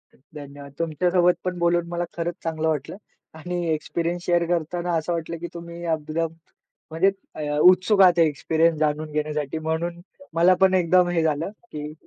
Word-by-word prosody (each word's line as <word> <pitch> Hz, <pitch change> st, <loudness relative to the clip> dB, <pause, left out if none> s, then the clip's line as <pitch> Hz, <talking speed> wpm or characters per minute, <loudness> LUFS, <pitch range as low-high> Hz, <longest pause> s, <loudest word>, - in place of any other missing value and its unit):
धन्यवाद! 140 Hz, 0 st, -12 dB
तुमच्या 165 Hz, +2 st, 0 dB
सोबत 180 Hz, 0 st, +4 dB
पण 180 Hz, -1 st, -3 dB
बोलून 170 Hz, 0 st, +1 dB
मला 175 Hz, 0 st, -2 dB
खरंच 170 Hz, 0 st, -2 dB
चांगलं 160 Hz, -1 st, -2 dB
वाटलं. 155 Hz, +2 st, -2 dB, 0.4 s
आणि 175 Hz, +2 st, -4 dB
एक्सपिरियन्स 170 Hz, +3 st, -3 dB
शेअर 175 Hz, -1 st, +2 dB
करताना 175 Hz, +1 st, -1 dB
असं 160 Hz, +2 st, -2 dB
वाटलं, 165 Hz, 0 st, -4 dB
की 175 Hz, -, -6 dB
तुम्ही 170 Hz, 0 st, -8 dB
एकदम 155 Hz, +1 st, -2 dB, 0.6 s
म्हणजे 175 Hz, +5 st, +3 dB, 0.4 s
अ, 150 Hz, 0 st, -1 dB
उत्सुक 185 Hz, +3 st, +5 dB
आहात 180 Hz, -2 st, +6 dB
एक्सपिरियन्स 160 Hz, +1 st, +2 dB
जाणून 155 Hz, 0 st, -1 dB
घेण्यासाठी, 150 Hz, -1 st, -2 dB
म्हणून 165 Hz, +2 st, -3 dB, 0.3 s
मला 170 Hz, +3 st, +5 dB
पण 190 Hz, 0 st, +5 dB
एकदम 180 Hz, 0 st, +4 dB
हे 170 Hz, -2 st, +1 dB
झालं, 155 Hz, +3 st, 0 dB, 0.2 s
की 150 Hz, 0 st, -6 dB
165 Hz, 160 wpm, -24 LUFS, 155-175 Hz, 0.6 s, आहात